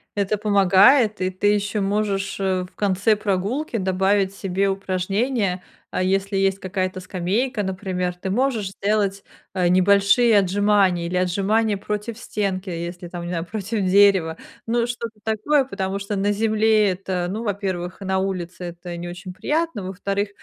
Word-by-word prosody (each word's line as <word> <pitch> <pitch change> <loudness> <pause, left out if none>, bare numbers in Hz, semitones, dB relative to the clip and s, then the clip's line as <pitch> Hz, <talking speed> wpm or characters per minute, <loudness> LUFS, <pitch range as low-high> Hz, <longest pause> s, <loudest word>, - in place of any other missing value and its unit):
это 205 +1 0
помогает, 205 +2 +4
и 185 - +1
ты 185 +2 -1
еще 205 0 -1
можешь, 200 -1 -1
э, 190 -1 0
в 180 - -13
конце 200 +2 +2
прогулки 210 +7 -2
добавить 190 +1 +1
себе 195 0 -1
упражнения. 195 +1 -1 0.3
А - - 0
если 195 +1 0
есть 195 0 +1
какая-то 185 0 -3
скамейка, 200 +6 -1
например, 185 -2 -3
ты 190 +2 -5
можешь 225 -3 0
сделать, 200 -1 -1 0.3
э, 180 -2 +1
небольшие 200 +5 +4
отжимания 195 -2 +2
или 180 +1 -2
отжимания 200 +4 +1
против 210 +3 -4
стенки, 195 -4 -3
если 175 +1 -5
там, 175 -1 -6
не - - -5
знаю, 170 -1 -2
против 215 +1 -3
дерева, 190 -4 +4 0.3
ну, 235 +1 +1
что-то 230 -2 -6
такое, 225 +7 +1
потому 195 -4 -3
что 200 +1 -4
на 200 +1 +1
земле 215 -1 +3
это, 180 -1 -3
ну, 220 +4 -4
во-первых, 190 -4 -3
на 190 -1 -1
улице 185 -2 -4 0.2
это 175 0 -7
не 175 +1 -6
очень 180 +1 -8
приятно, 305 - -1
во-вторых, 200 +2 -2
195 Hz, 155 wpm, -22 LUFS, 185-210 Hz, 0.3 s, помогает